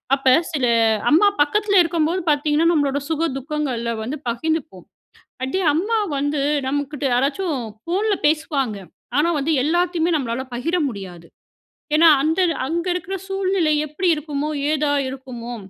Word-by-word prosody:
அப்ப 270 -2 +3 0.2
சில 285 -6 0 0.5
அம்மா 335 +7 +6
பக்கத்தில 400 +6 +3
இருக்கும்போது 335 +1 0
பார்த்தீங்கன்னா, 300 +2 +2
நம்மளோட 285 -4 +1
சுக 325 +1 0
துக்கங்கள்ல 265 -5 -3
வந்து 270 +7 -5
பகிர்ந்துப்போம். 250 - -3 0.6
அப்படியே 270 +9 -1
அம்மா 410 +9 0 0.2
வந்து 290 +1 -1 0.3
நம்ம 285 +2 0
கிட்ட 295 -1 -5
யாராச்சும் 285 +6 0 0.3
ஃபோன்ல 405 +5 0
பேசுவாங்க. 295 -7 0 0.4
ஆனா 310 +3 +3
வந்து, 290 +3 0
எல்லாத்தையுமே 345 +1 +1
நம்மளால 255 -2 -3
பகிர 330 +9 -1
முடியாது. 185 -7 -9 0.7
ஏன்னா? 325 +2 +7
அந்த 320 +4 +1 0.3
அங்க 335 +3 -2
இருக்கற 360 +2 -4
சூழ்நிலை 380 -5 +1
எப்படி 305 +6 -2
இருக்குமோ? 300 -1 -3 0.2
ஏதா 300 -1 +1 0.2
இருக்குமோ? 250 -3 -7
300 Hz, 130 wpm, -21 LUFS, 270-335 Hz, 0.7 s, ஏன்னா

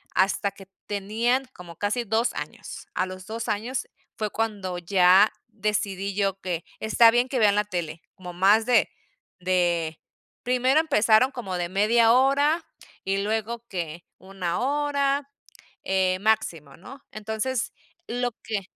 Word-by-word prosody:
hasta 195 +1 +2
que 195 -1 -15 0.2
tenían 225 +6 0
como 170 -2 -12
casi 210 +5 -1
2 225 +3 +1
años. - - -8
A 185 - +1
los 185 0 -9
2 225 +1 -5
años 235 +5 -2 0.3
fue 215 -2 -2
cuando 205 -5 -2
ya 185 +3 +5 0.2
decidí 200 -2 -2
yo 195 -1 0
que 175 -3 -3
está 225 +1 +5
bien 245 +2 +2
que 260 - -1
vean 205 -2 +4
la 210 - +2
tele 170 -4 -4
como 180 -1 -9
más 205 +5 +4
de 245 - +3 0.5
de 175 -3 0 0.4
primero 255 +4 +3
empezaron 230 -5 +4
como 230 -9 -5
de 175 -1 -2
media 225 +4 +4
hora 285 +5 +3 0.4
y 195 +1 0
luego 220 +3 -2
que 170 -4 -5
1 185 -2 -4
hora, 280 0 0 0.5
eh, 190 -1 +1
máximo, 190 -9 0
¿no? 265 +10 -13
Entonces, 220 +3 -3 0.4
lo 245 +1 -1
que 215 -3 -2
210 Hz, 140 wpm, -25 LUFS, 185-240 Hz, 0.5 s, ya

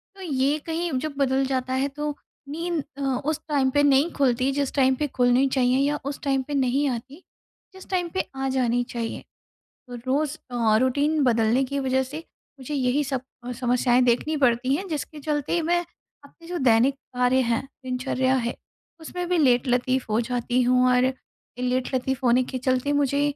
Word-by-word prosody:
तो 390 - -13
ये 285 -3 +1
कहीं 335 +1 -2
जब 310 +1 -4
बदल 270 -1 +2
जाता 260 -1 -2
है 265 +2 +1
तो 295 +1 -4 0.3
नींद 330 0 -2
अ, 280 - -6
उस 275 +3 -1
टाइम 280 -3 +2
पे 290 +1 +3
नहीं 285 +3 +4
खुलती 260 -1 +1
जिस 280 -1 -1
टाइम 265 -1 +4
पे 300 +2 -1
खुलनी 250 0 +3
चाहिए 255 -1 +2
या 290 +2 +1
उस 280 0 -4
टाइम 270 -1 +1
पे 295 - -4
नहीं 275 +1 +1
आती 265 +7 -6 0.5
जिस 380 - -13
टाइम 360 -2 0
पे 375 - -1
आ 270 0 -2
जानी 245 -2 +1
चाहिए। 230 -1 -4 0.7
तो 245 - -8
रोज़ 290 +3 0 0.2
अ 225 -3 +3
रूटीन 290 +4 +1
बदलने 230 +2 +3
की 280 +2 -3
वजह 265 0 +1
से 275 +4 -6 0.4
मुझे 290 +3 -5
यही 270 +2 +1
सब 270 -2 -2 0.2
अ, 250 - -4
समस्याएँ 250 0 +2
देखनी 250 +6 +1
पड़ती 255 -1 +2
हैं, 380 +6 -3
जिसके 305 -1 -5
चलते 300 +3 -1
मैं 345 +2 +2 0.4
अपने 330 +4 -17
जो 355 - -3
दैनिक 245 +3 +4 0.2
कार्य 250 +1 +3
हैं, 235 -1 0 0.2
दिनचर्या 260 +1 0
है, 240 -2 -1 0.5
उसमें 355 +2 -5
भी 360 -1 +1
लेटलतीफ़ 250 -1 +2
हो 215 +2 +2
जाती 245 +1 -1
हूँ 250 +1 +3
और 255 +1 +3 0.5
लेट-लतीफ़ 255 +1 -1
होने 245 +1 +4
के 260 - -3
चलते 255 +2 0
मुझे 285 0 +1
265 Hz, 180 wpm, -24 LUFS, 250-290 Hz, 0.7 s, नहीं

